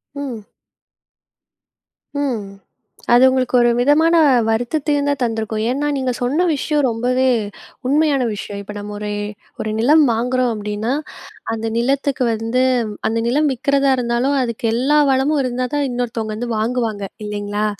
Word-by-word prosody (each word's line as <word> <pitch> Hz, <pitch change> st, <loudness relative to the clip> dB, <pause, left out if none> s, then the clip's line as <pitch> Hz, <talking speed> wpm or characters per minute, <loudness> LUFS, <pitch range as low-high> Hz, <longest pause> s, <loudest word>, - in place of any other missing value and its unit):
ம். 250 Hz, -7 st, -6 dB, 1.7 s
ம். 255 Hz, -8 st, -1 dB, 0.7 s
அது 245 Hz, +2 st, +6 dB
உங்களுக்கு 260 Hz, -1 st, 0 dB
ஒரு 240 Hz, -, +4 dB
விதமான 315 Hz, +6 st, +4 dB, 0.3 s
வருத்தத்தையும் 285 Hz, +5 st, 0 dB
தான் 285 Hz, -, -1 dB
தந்திருக்கும். 220 Hz, -1 st, -2 dB
ஏன்னா, 290 Hz, +3 st, -1 dB
நீங்க 260 Hz, -1 st, -1 dB
சொன்ன 295 Hz, +9 st, +1 dB
விஷயம் 295 Hz, +1 st, 0 dB
ரொம்பவே 250 Hz, +3 st, +1 dB, 0.6 s
உண்மையான 290 Hz, -2 st, +2 dB
விஷயம். 200 Hz, 0 st, -6 dB
இப்ப 210 Hz, +1 st, -8 dB
நம்ம 205 Hz, 0 st, -7 dB
ஒரே, 210 Hz, 0 st, -4 dB, 0.5 s
ஒரு 215 Hz, -, -2 dB
நிலம் 300 Hz, +6 st, +5 dB
வாங்குறோம் 250 Hz, +1 st, 0 dB
அப்படீன்னா, 210 Hz, +4 st, -3 dB, 0.6 s
அந்த 225 Hz, 0 st, -3 dB
நிலத்துக்கு 270 Hz, +1 st, 0 dB
வந்து 230 Hz, +3 st, 0 dB, 0.5 s
அந்த 230 Hz, -, -1 dB
நிலம் 295 Hz, +4 st, +2 dB
விற்கிறதா 275 Hz, +2 st, +1 dB
இருந்தாலும், 245 Hz, +3 st, 0 dB
அதுக்கு 235 Hz, -1 st, -3 dB
எல்லா 280 Hz, +5 st, +3 dB
வளமும் 275 Hz, +3 st, +2 dB
இருந்தா 250 Hz, 0 st, -2 dB
தான் 285 Hz, -1 st, +1 dB
இன்னொருத்தவங்க 230 Hz, -3 st, -3 dB
வந்து 240 Hz, 0 st, -4 dB
வாங்குவாங்க, 225 Hz, -2 st, -1 dB, 0.2 s
இல்லைங்களா? 205 Hz, 0 st, -2 dB
250 Hz, 130 wpm, -19 LUFS, 225-280 Hz, 1.7 s, அது